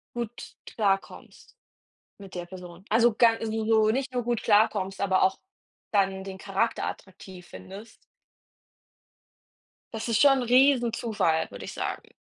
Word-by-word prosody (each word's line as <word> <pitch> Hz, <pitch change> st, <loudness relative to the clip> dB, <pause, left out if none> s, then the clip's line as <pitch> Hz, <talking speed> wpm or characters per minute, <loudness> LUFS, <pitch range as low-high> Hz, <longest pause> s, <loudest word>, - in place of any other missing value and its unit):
gut 235 Hz, -1 st, -6 dB
klarkommst 200 Hz, -, -3 dB, 0.6 s
mit 195 Hz, -2 st, -12 dB
der 175 Hz, -, -5 dB
Person. 180 Hz, 0 st, -11 dB
Also, 230 Hz, 0 st, +4 dB
gan 230 Hz, 0 st, +4 dB
also, 220 Hz, -1 st, -3 dB
so 220 Hz, -1 st, +4 dB
nicht 260 Hz, +2 st, -2 dB
nur 245 Hz, -, -1 dB
gut 240 Hz, -1 st, -2 dB
klarkommst, 205 Hz, -2 st, +2 dB
aber 190 Hz, -1 st, +2 dB
auch 190 Hz, -, +2 dB, 0.5 s
dann 195 Hz, -1 st, +1 dB
den 190 Hz, -1 st, -7 dB
Charakter 200 Hz, +4 st, -1 dB
attraktiv 185 Hz, -1 st, -9 dB
findest. 205 Hz, +4 st, -11 dB, 2.0 s
Das 225 Hz, +1 st, -4 dB
ist 230 Hz, -1 st, +1 dB
schon 280 Hz, +1 st, +7 dB
'n -, -, -2 dB
Riesenzufall, 235 Hz, -, +2 dB
würde 100 Hz, -, -9 dB
ich -, -, -7 dB
sagen. -, -, -5 dB
215 Hz, 135 wpm, -26 LUFS, 190-230 Hz, 2.0 s, schon